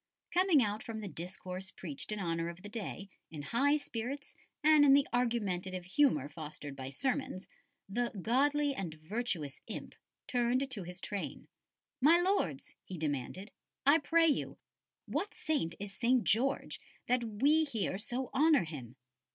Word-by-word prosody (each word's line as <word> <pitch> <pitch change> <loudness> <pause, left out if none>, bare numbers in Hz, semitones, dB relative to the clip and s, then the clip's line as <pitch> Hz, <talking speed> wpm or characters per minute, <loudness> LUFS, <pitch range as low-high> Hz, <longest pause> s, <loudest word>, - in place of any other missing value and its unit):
Coming 355 -7 +5
out 210 0 -1
from 225 -1 -5
the 205 - -5
discourse 185 +1 -6
preached 165 -1 -5
in 210 - -2
honour 165 -2 -1
of 170 +2 -10
the 205 - -7
day, 205 -2 -5 0.2
in 150 -3 -7
high 275 - +3
spirits 275 0 -5 0.3
and 305 -1 +7
in 275 -1 +7
the 280 0 +4
argumentative 195 -7 0
humour 190 - +3
fostered 150 -2 -7
by 130 -1 -6
sermons, 255 - -2 0.4
the 235 +4 0
"godly 285 +7 +2
and 180 -10 -4
virtuous 160 - -3
imp" - - -6 0.3
turned 250 +2 +1
to 210 - -4
his 180 0 -7
train. 205 -2 -4 0.5
"My 320 +6 +7
Lords," 350 - 0
he 185 - -7
demanded, 155 - -3 0.3
"I 290 +4 +7
pray 330 +3 +4
you, 295 - 0 0.5
what 410 - -2
saint 290 - -1
is 200 -1 -6
St. 240 +4 +2
George, 265 +6 +1 0.3
that 250 0 +2
we 275 +9 +3
here 220 -9 -2
so 245 +4 -3
honour 305 - +5
him?" 135 -7 -8
220 Hz, 150 wpm, -33 LUFS, 180-275 Hz, 0.5 s, and